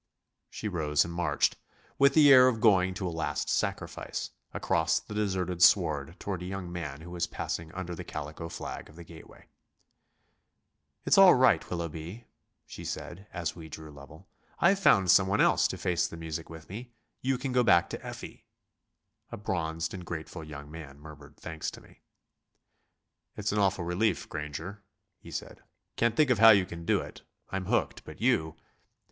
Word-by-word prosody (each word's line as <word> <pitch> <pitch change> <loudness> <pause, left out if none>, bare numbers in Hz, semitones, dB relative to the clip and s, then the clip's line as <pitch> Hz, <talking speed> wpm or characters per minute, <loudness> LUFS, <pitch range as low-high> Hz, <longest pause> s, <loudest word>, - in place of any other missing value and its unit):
She 110 - -5
rose 80 -6 +1
and 85 - -6
marched, 80 -4 +1 0.4
with 140 0 +5
the 145 -3 +8
air 130 -1 +8
of 120 -3 +1
going 95 -4 +4
to 95 -1 -3
a 85 - -4
last 80 - -2
sacrifice, - - -3 0.2
across - - +1
the - - -11
deserted 95 -4 -1
sward 75 -1 +3
toward 95 -3 -4
a - - -5
young 95 -2 -5
man 75 -4 -5
who 85 +2 -10
was 85 -1 -2
passing 80 -1 -5
under 90 -2 -5
the - - -6
calico 75 +2 -6
flag - - -7
of 75 - -16
the 85 - -10
gateway. 80 -1 -15 1.6
"It's - - +5
all 195 -2 +9
right, 125 -10 +3
Willoughby," 85 +5 -5 0.4
she - - -10
said, 95 +4 -6
as 85 -2 -3
we 80 -2 -10
drew 80 0 -9
level, 75 +6 -14 0.3
"I've 195 +3 +4
found 95 - +5
someone 95 +1 +4
else - - +4
to - - -5
face 90 -1 0
the 85 - -9
music 80 0 -6
with 80 -1 -11
me; 120 +5 -9 0.3
you 130 0 0
can 135 +1 -4
go 125 0 +3
back 85 -6 +5
to - - -6
Effie." - - -9 0.8
A - - -5
bronzed 85 -4 -3
and 90 -2 -7
grateful 80 0 -6
young 75 -1 -9
man 75 -3 -10
murmured 75 -1 -13
thanks 80 -1 -5
to - - -11
me. - - -20 1.4
"It's 105 0 -1
an 105 - 0
awful 95 -3 +1
relief, 95 +6 0
Granger," 80 +7 -6 0.4
he - - -13
said; - - -7 0.3
"can't 115 -1 +1
think 140 -5 +4
how 115 +1 +8
you 100 -4 +6
can 85 -2 -9
do - - +2
it. - - -10 0.3
I'm 95 -1 -3
hooked, - - 0
but - - -11
you...." 80 0 +1
85 Hz, 175 wpm, -29 LUFS, 80-100 Hz, 1.6 s, all